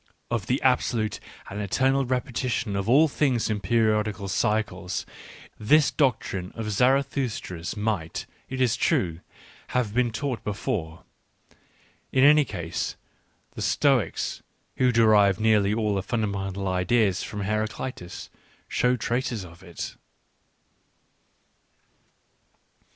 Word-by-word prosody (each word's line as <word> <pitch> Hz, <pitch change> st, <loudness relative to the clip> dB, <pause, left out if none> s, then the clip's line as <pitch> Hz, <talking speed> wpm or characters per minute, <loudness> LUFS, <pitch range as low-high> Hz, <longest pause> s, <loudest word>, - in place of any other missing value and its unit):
of 115 Hz, -4 st, -1 dB
the 130 Hz, -, +1 dB
absolute 120 Hz, -4 st, +1 dB, 0.3 s
and 105 Hz, +2 st, -5 dB
eternal 135 Hz, +7 st, +1 dB
repetition 125 Hz, -3 st, -1 dB
f -, -, 0 dB
of 100 Hz, +3 st, -3 dB
all 150 Hz, +6 st, +6 dB
things 135 Hz, -6 st, +1 dB
jp 105 Hz, -2 st, -1 dB
p?riQflfc^) 105 Hz, 0 st, +1 dB
liY*?!?? 90 Hz, -5 st, -6 dB, 0.4 s
— -, -, -24 dB
this 145 Hz, +8 st, +4 dB
doctrine 110 Hz, -, 0 dB
of 110 Hz, -2 st, -3 dB
Zarathustra's 125 Hz, -7 st, 0 dB
might, 105 Hz, -7 st, -2 dB, 0.2 s
it 130 Hz, -, -4 dB
is 125 Hz, -2 st, +3 dB
true, 95 Hz, -, +1 dB, 0.6 s
have 115 Hz, -5 st, 0 dB
been 125 Hz, 0 st, +2 dB
taught 120 Hz, +2 st, -3 dB
be 105 Hz, -, -2 dB
fore. 80 Hz, -5 st, -4 dB, 1.1 s
In 130 Hz, -, +3 dB
any 150 Hz, +1 st, +7 dB
case, 85 Hz, -7 st, -4 dB, 0.6 s
the -, -, -8 dB
Stoics, -, -, +1 dB, 0.4 s
who 125 Hz, -1 st, +3 dB
derived 105 Hz, -4 st, +5 dB
nearly 105 Hz, -2 st, +3 dB
all 105 Hz, -1 st, 0 dB
their 95 Hz, -, 0 dB
fundamental 100 Hz, -3 st, -2 dB
ideas 95 Hz, +1 st, +2 dB
from 105 Hz, -, -5 dB
Heraclitus, 110 Hz, -1 st, -4 dB, 0.4 s
show 125 Hz, 0 st, +2 dB
traces 120 Hz, -3 st, -2 dB
of 85 Hz, 0 st, -14 dB
it. 85 Hz, -3 st, -7 dB
110 Hz, 120 wpm, -26 LUFS, 100-125 Hz, 1.1 s, any